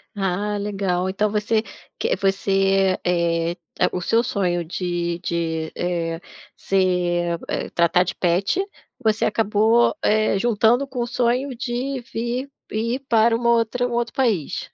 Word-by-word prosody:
Ah, 200 +2 -1
legal, 195 -3 -1
então 205 +2 0
você 215 +1 +1 0.3
que 470 +2 0
você, 195 -1 +2
eh, 170 -1 +1 0.3
a - - +4
o 180 - -2
seu 225 +6 +2
sonho 180 -7 0
de 175 0 -2
de, 160 -2 -2
eh, 170 -1 -2 0.3
ser, 175 -3 0
eh - - -3
tratar 170 +1 +3
de 185 - -3
pet, 190 - +1 0.4
você 220 0 +2
acabou, 220 +4 +3
eh, 215 -2 +2
juntando 235 +4 +3
com 260 -2 -6
o 240 - 0
sonho 250 +2 0
de 255 +2 -3
vir 240 +4 -2 0.2
ir 230 +4 -1
para 225 0 +4
uma 235 0 +1
outra 235 +2 +1
um 240 - -5
outro 235 0 -1
país? 220 - -1
205 Hz, 140 wpm, -22 LUFS, 180-235 Hz, 0.4 s, a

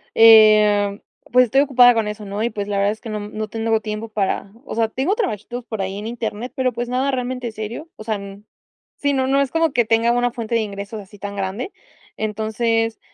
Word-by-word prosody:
Em, 215 -2 +6 0.3
pues, 250 0 +6
estoy 270 +4 +3
ocupada 250 -3 +6
con 225 -2 0
eso, 210 0 -6
¿no? 200 +1 -4
Y 235 - +1
pues 205 -1 -5
la 200 -1 -2
verdad, 200 +1 +2
es 220 - -15
que 225 - -8
no 215 - -3
m 205 0 -6
no 215 0 -3
te 225 +2 -7
no 225 - -1
hubo 220 0 +3
tiempo 215 +1 -5
para 200 -1 -2
O - - -6
sea, 225 -1 +2
tengo 275 - 0
trabajitos 245 - -3
por 220 -3 -4
ahí 190 +1 -3
en 210 +2 -5
internet, 235 0 -5
pero 255 -1 +1
pues, 240 +1 -4
nada 260 +2 0
realmente 250 -2 -3
serio. 220 +9 -6
O 215 - -9
sea, 215 -1 -1
n 200 0 -9 0.5
sí, 285 0 0
no 260 -1 +1
no 275 +1 +3
es 275 - -1
como 325 -2 +2
que 240 -2 +3
tenga 230 +1 +3
una 245 0 +1
fuente 230 -1 -3
de 230 - +3
ingresos, 200 +1 -6
así 200 +1 -15
tan 200 +1 -6
grande. 200 - -3 0.5
Entonces, 220 +1 -1
225 Hz, 240 wpm, -21 LUFS, 210-245 Hz, 0.5 s, Em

